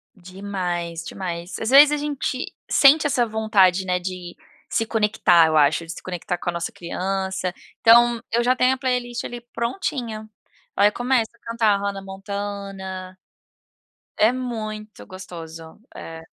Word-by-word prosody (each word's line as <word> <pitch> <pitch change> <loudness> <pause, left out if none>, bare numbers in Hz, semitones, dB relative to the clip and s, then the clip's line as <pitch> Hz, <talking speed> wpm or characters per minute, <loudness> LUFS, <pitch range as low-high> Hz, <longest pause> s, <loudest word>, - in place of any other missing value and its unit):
Demais, 180 -3 -4
demais. 175 -2 -5
Às 225 - -2
vezes 285 +3 +8
a 300 - +1
gente, 285 -3 -3 0.2
sente 285 +2 +6
essa 255 -4 +2
vontade, 210 -4 +2
né, 180 -1 0
de 180 -1 -6 0.3
se 225 - 0
conectar 210 -7 +3
eu 160 - 0
acho, 155 +2 +3
de 165 - -7
se - - -10
conectar, 180 -1 -4
com 175 - -4
a - - -2
nossa 170 0 -3
criança, 190 0 -3 0.3
então, 235 0 +6
eu 235 +1 +3
já 250 +1 +3
tenho 255 0 +3
a - - -4
playlist 250 -2 -2
ali 240 - -6
prontinha. 235 - -3 0.5
Ai 205 +1 +4
começo 245 -1 0
a 235 - -27
cantar 230 -1 +2
a - - 0
Hanna 200 0 -3
Montana, 195 -1 -6 1.0
é 220 +3 +4
muito 215 -4 -6
gostoso, 165 -3 -10 0.2
é. 165 0 -8
200 Hz, 150 wpm, -22 LUFS, 180-235 Hz, 1.0 s, vezes